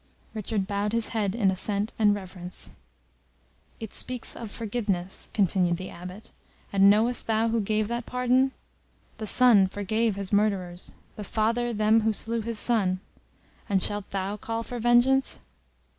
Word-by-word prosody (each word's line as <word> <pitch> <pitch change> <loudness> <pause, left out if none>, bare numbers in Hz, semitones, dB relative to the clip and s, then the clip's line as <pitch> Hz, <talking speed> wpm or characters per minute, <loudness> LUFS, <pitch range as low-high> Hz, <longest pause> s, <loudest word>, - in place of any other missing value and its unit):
Richard 215 -2 -2
bowed 205 +1 -2
his 230 -1 +1
head 210 -3 -1
in 205 -5 +3
assent 200 +3 0
and 205 -2 +4
reverence. 185 -2 -7 1.1
"It 220 -2 -7
speaks 250 -1 0
of 230 -2 -7
forgiveness," 205 -5 -3
continued 185 -4 +2
the 185 +1 -7
Abbot. 180 +4 -10 0.4
"And 195 0 +6
knowest 225 +4 +3
thou 225 0 +2
who 230 0 +1
gave 215 +1 0
that 235 +1 -3
pardon? 250 +1 +2 0.7
The 215 - -4
Son 225 -5 +6
forgave 215 +3 -1
His 200 0 -5
murderers; 190 -4 0 0.2
the 210 - -5
Father 230 +3 0
them 215 0 +3
who 220 0 +1
slew 230 +2 -2
His 230 0 -3
Son. 200 -6 +1 0.7
And 195 -1 +3
shalt 205 +1 0
thou 195 +1 -3
call 225 +2 -4
for 245 +1 -6
vengeance?" 240 +3 +3
215 Hz, 150 wpm, -26 LUFS, 195-230 Hz, 1.1 s, And